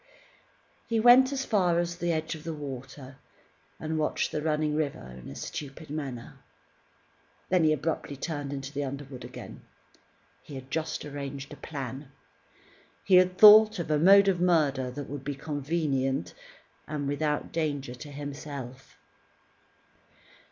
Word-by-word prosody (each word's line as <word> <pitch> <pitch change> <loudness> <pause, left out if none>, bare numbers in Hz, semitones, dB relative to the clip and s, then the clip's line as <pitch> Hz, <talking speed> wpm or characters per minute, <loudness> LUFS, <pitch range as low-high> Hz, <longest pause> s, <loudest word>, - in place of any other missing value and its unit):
He 230 -2 +1
went 245 +3 +7
as 270 -1 -2
far 180 -5 +2
as 175 0 -1
the 175 -1 -1
edge 160 0 -2
of 155 -2 -9
the 165 -1 -4
water, 135 -1 -8 0.6
and 160 0 -2
watched 150 - 0
the 150 - -2
running 155 -1 0
river 140 - -3
in - - -10
a - - -9
stupid 145 +1 -7
manner. 135 -6 -6 1.1
Then, 180 -3 +3
he 155 - +4
abruptly 155 -1 -2
turned 145 -2 -4
into 135 0 -6
the 145 0 -2
underwood 140 -1 -7
again. - - -10 0.8
He 145 - -11
had 130 0 -9
just 160 -1 -3
arranged 140 -1 -6
a - - -11
plan. 135 -1 -7 0.9
He 190 -2 +5
had 185 0 +3
thought 215 +1 +9
of 170 -3 -3
a 150 - +3
mode 195 +4 +7
of 180 -3 +2
murder 145 -7 +2
that 140 +2 -7
would 140 -1 -6
be 145 0 -3
convenient, 140 - -2 0.5
and 150 -2 -3
without 150 +1 -1
danger 145 -6 -2
to 145 +4 -10
himself. 140 -3 -8
150 Hz, 145 wpm, -28 LUFS, 135-165 Hz, 1.1 s, thought